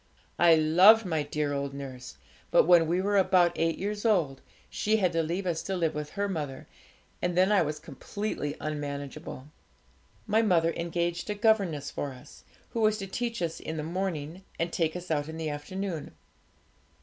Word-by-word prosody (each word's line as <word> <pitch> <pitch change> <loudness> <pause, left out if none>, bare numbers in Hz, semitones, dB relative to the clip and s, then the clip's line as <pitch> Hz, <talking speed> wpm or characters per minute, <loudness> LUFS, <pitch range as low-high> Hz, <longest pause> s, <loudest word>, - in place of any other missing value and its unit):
I 170 -1 +7
loved 185 +8 +6
my 160 -4 0
dear 145 0 -2
old 140 0 -3
nurse; 130 -2 -8 0.3
but - - +5
when 170 -1 +5
we 180 +3 +1
were 205 0 +2
about 180 -2 +4
eight 165 0 0
years 205 +1 -3
old, 170 - +1 0.3
she 215 +1 0
had 185 -4 +1
to 165 - +2
leave 170 +4 -2
us 170 -3 -1
to 195 - -3
live 165 -3 0
with 150 0 -4
her 200 0 -1
mother, 150 -8 -4 0.6
and 175 0 -1
then 185 +3 +4
I 205 - +5
was 155 -1 -1
completely 155 -3 -5
unmanageable. 145 -2 -5 0.8
My 215 +1 +3
mother 170 -6 +3
engaged 170 +2 -2
a 210 - -1
governess 200 -9 +1
for 140 -2 -4
us, 125 - -15 0.3
who 230 - -3
was 215 0 +3
to 195 - -5
teach 230 +1 -3
us 165 -1 -3
in 160 0 -5
a - - -3
morning 170 0 -3
and 165 +1 -2
take 160 -1 0
us 180 -1 -6
out 145 -1 0
in 160 - -6
the 160 -1 -3
afternoon. 165 +2 -5
170 Hz, 185 wpm, -28 LUFS, 150-195 Hz, 0.8 s, I